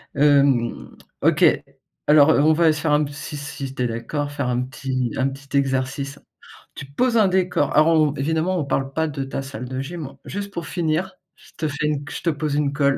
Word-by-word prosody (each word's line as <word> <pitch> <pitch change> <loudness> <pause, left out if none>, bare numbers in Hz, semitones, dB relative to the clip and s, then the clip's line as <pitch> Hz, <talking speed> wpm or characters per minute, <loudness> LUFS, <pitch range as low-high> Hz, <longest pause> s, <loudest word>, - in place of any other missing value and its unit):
hem, 140 -4 +2 0.3
OK. - - +3 0.6
Alors, 150 +1 +7
heu, 145 - +3
on 155 +2 +5
va 165 +2 +2
aller 155 - +5
se 155 - -4
faire 150 -2 +1
un 150 +1 +4
p 145 - -5
si 145 +1 -7
si 140 -2 -6
tu 125 - -1
es 125 - +1
d'accord, 145 +6 -3
faire 145 -3 -2
un 125 0 0
petit, 130 -2 -3
un 130 - +2
petit 140 +1 -4
exercice. 135 +1 -1 0.6
Tu - - -7
poses 230 - 0
un 215 -3 +5
décor, 180 -6 +1
alors 155 +2 +5
on 155 -2 +4
on - - -4
évidemment 160 +6 0
on 150 - -1
parle 135 0 -1
pas 160 +1 0
de 145 -2 -4
ta 135 - -4
salle 135 -3 -7
de 130 0 -4
gym 155 0 -7
juste 200 0 -5
pour 170 - -4
finir, 175 +2 -1 0.2
je - - -20
te 155 - -1
fais 150 +1 -3
une 145 -1 -1
je - - -6
te 170 - +2
pose 150 -1 -2
une 145 -1 0
colle. 140 -1 +2
145 Hz, 230 wpm, -22 LUFS, 135-155 Hz, 0.6 s, Alors